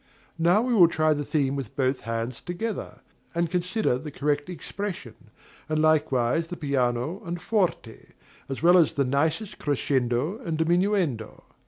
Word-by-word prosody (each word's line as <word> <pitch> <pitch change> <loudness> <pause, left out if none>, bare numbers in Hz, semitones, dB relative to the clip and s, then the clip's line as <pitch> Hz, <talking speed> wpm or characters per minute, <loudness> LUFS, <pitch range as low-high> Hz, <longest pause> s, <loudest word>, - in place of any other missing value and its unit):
Now 175 +7 +4
we 250 0 0
will 180 -7 +7
try 155 -1 +2
the 145 0 -2
theme 140 -2 0
with 135 -6 -6
both 130 -1 +1
hands 115 +1 -4
together, 205 +5 -5 0.3
and 170 -1 0
consider 180 - 0
the 150 - -7
correct 145 +2 -1
expression, 180 - -5 0.6
and 155 0 +1
likewise 155 -1 +2
the 175 0 -6
piano 140 - -1
and 175 -1 -4
forte, 180 - -1 0.4
as 135 +3 -5
well 175 +2 +7
as 165 - +3
the 140 - +2
nicest 160 - -1
crescendo 140 - 0
and 165 -11 -3
diminuendo. 170 - 0
155 Hz, 150 wpm, -26 LUFS, 135-175 Hz, 0.6 s, will